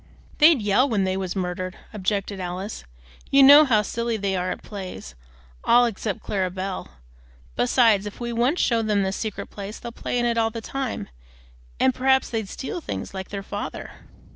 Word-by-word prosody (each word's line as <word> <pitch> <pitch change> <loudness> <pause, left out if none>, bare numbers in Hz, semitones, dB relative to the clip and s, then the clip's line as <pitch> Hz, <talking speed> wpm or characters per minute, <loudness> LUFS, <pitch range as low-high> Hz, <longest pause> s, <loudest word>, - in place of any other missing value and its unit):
"They'd 300 -6 +6
yell 210 +7 +3
when 210 -5 +1
they 190 0 0
was 190 -1 -3
murdered," 185 0 -3 0.2
objected 200 0 -2
Alice; 185 - -5 0.4
"you 275 0 +6
know 290 +3 +9
how 220 -6 +3
silly 235 +2 -2
they 200 -2 -1
are 180 0 -1
at - - -5
plays, 190 - -8 0.5
all 245 +1 +5
except 215 -3 -3
Clara 190 -2 -1
Belle. 190 +1 -5 0.7
Besides 210 - +3
if 205 - -9
we 240 -1 -3
once 245 +9 +1
show 230 -2 +2
them 210 -2 +1
this 190 0 -1
secret 215 -3 -5
place, 200 +1 -7
they'll 235 - -7
play 245 - -3
in 240 - +1
it 235 -1 +1
all 225 0 +2
the 230 +1 -6
time, 260 - -4 0.7
and 260 - +3
perhaps 265 +1 +2
they'd 220 -4 -2
steal 340 +6 -5
things, - - -5
like 190 -1 -6
their 200 -1 -5
father." 205 +1 -6
210 Hz, 185 wpm, -24 LUFS, 190-240 Hz, 0.7 s, know